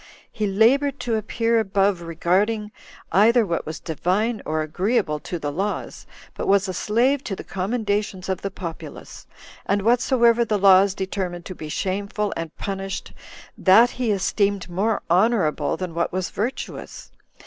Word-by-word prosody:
He 215 -1 -2
labored 255 +8 +3
to 240 -2 -2
appear 230 +2 +1
above 195 -3 +1
regarding 195 +6 0 0.4
either 225 +5 +5
what 170 -4 -3
was 155 - -5
divine 195 +7 -1
or 155 0 0
agreeable 180 0 0
to 175 - -5
the 145 -3 -3
laws, 195 +7 -4 0.3
but - - -5
was 195 0 +3
a 185 - -3
slave 250 +9 +1
to 195 - -3
the - - -8
commendations 205 -1 -2
of 190 -1 -2
the 200 - -3
populace; 175 -4 -9 0.4
and 200 0 0
whatsoever 235 0 +3
the 215 -2 0
laws 195 0 +5
determined 185 -2 -4
to 185 - -6
be 155 -3 -8
shameful, 200 +5 -2
and 165 -1 -6
punished, 195 -1 -5 0.4
that 220 +6 +5
he 240 - +1
esteemed 200 -1 0
more 205 +5 0
honorable 185 -2 +2
than 180 -3 -5
what 170 +1 -1
was 185 0 -3
virtuous. 235 +6 -5
200 Hz, 150 wpm, -23 LUFS, 185-220 Hz, 0.4 s, either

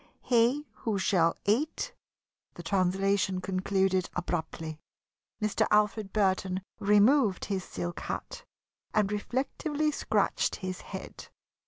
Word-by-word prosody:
He 245 +5 +3
who 220 -3 -1
shall 175 -4 +2
eat 300 - 0 0.3
" - - -51
The - - -8
translation 190 0 +1
concluded 190 0 0
abruptly. 160 -3 -3 0.6
Mr. 215 0 +1
Alfred 210 -1 +2
Burton 190 -2 +1 0.2
removed 210 +1 +4
his 195 -2 -2
silk 85 - -5
hat - - -5 0.5
and 210 -2 +3
reflectively 280 +7 -1
scratched - - +1
his 185 -1 -5
head. - - -8
200 Hz, 110 wpm, -29 LUFS, 185-220 Hz, 0.6 s, removed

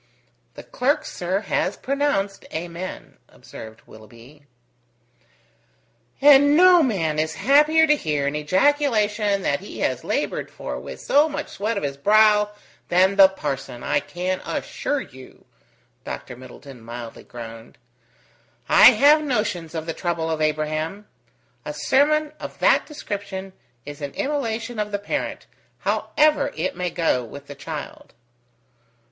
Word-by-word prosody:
"The - - -10
clerk, - - 0
sir, 185 +3 -2
has 195 -1 -1
pronounced 265 -8 -1
Amen," 170 +3 -7
observed 110 0 -12
Willoughby. 120 +7 -16 1.7
"And 285 +1 +6
no 360 -1 +7
man 165 - 0
is 155 0 -1
happier 300 +4 +4
to 300 -1 +4
hear 150 - -2
an 140 +1 -1
ejaculation 210 - +1
that - - 0
he - - -9
has - - -1
laboured - - -2
for - - -6
with - - -9
so 295 +3 +3
much 295 - -5
sweat 215 +2 -3
of - - -3
his 140 -1 -3
brow 210 +4 +4 0.4
than 185 +3 +3
the 195 -1 +8
parson, 135 -8 -5
I - - +1
can 185 +4 -3
assure 290 -1 -3
you," 130 - -14 0.6
Dr. 125 - -7
Middleton 130 +1 -13
mildly 115 0 -9
groaned. 115 -1 -11 0.9
"I - - +9
have 300 +2 +5
notions 210 - -2
of 160 -1 -4
the 165 - -3
trouble 165 -1 -2
of 155 -1 -2
Abraham. 155 +6 -2 0.6
A - - -6
sermon 300 +2 +2
of - - -8
that - - +3
description 200 -9 -6 0.3
is 145 +1 -9
an 140 -1 -5
immolation 240 -5 -3
of 210 0 -2
the 205 - 0
parent, 205 - -4 0.4
however 305 0 +1
it 165 +4 -2
may 180 0 -2
go 165 -8 0
with 140 +5 -11
the 145 - -9
child." 140 - -8
190 Hz, 135 wpm, -22 LUFS, -, 1.7 s, I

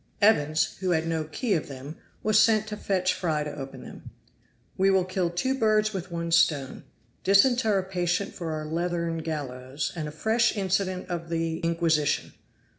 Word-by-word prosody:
Evans, 155 -8 +3
who 185 0 -1
had 165 -2 +1
no 165 -1 -1
key 215 - -1
of 160 - -1
them, 140 +3 -8 0.3
was 215 0 +4
sent 220 -1 +4
to 215 -1 -5
fetch 185 -3 0
Fry 165 -5 -1
to 150 -1 -5
open 135 -1 -8
them. - - -11 0.7
"We 195 +1 +3
will 190 -2 +3
kill 185 -1 -1
two 180 +10 0
birds 215 -4 +2
with 185 -1 -5
one 170 0 -3
stone 150 -5 +2 0.4
disinter 215 +2 +4
a 190 - 0
patient 180 +1 -1
for 165 -2 -5
our 155 -1 -4
leathern 170 +1 -2
gallows, 140 -3 -4
and 155 -3 -3
a - - -6
fresh 220 +9 +1
incident 190 -1 -1
of 170 -2 -4
the 165 -1 -1
Inquisition. 165 -3 +1
175 Hz, 175 wpm, -27 LUFS, 160-195 Hz, 0.7 s, was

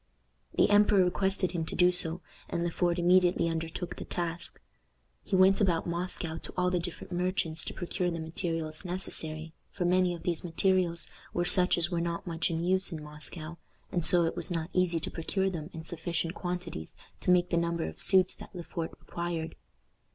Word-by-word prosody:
The - - +4
emperor 205 -2 +6
requested 190 0 +1
him 170 -2 -2
to - - -4
do 180 0 +5
so, 180 -1 +2 0.3
and 170 -1 -1
Le 175 - -1
Port 175 0 +1
immediately 175 -1 +4
undertook 165 +2 -3
the - - -5
task. 170 -1 -2 0.6
He 195 - -1
went 190 +2 +5
about 175 -5 +2
Moscow 170 -1 -3
to - - -7
all 180 0 +2
the 180 - +1
different 175 +1 -7
merchants 175 -2 0
to - - -4
procure 175 +1 -2
the 170 - -3
materials 160 0 -3
necessary 160 -3 -3 0.2
for 180 - -2
many 180 0 +3
of 170 - -11
these 170 -3 -1
materials 175 0 +1 0.3
were 175 - +1
such 180 0 +4
as 170 +1 +4
were 170 -1 0
not 170 0 -3
much 165 -2 -1
in 165 0 -2
use 190 +2 +1
in 155 -2 -5
Moscow, 155 +2 -5 0.3
and 175 - 0
so 175 +2 +7
it 165 - -1
was - - 0
not 165 0 -3
easy 180 -2 +2
to - - -5
procure 190 +3 -1
them 160 -3 -5
in 160 - -8
sufficient 165 0 -3
quantities 175 - -5 0.2
to - - -3
make 180 0 +4
the - - +2
number 170 0 0
of - - -6
suits 185 -2 +4
that - - -12
Le 175 - -5
Fort 165 -1 -4
required. 170 -2 -4
175 Hz, 195 wpm, -30 LUFS, 165-180 Hz, 0.6 s, so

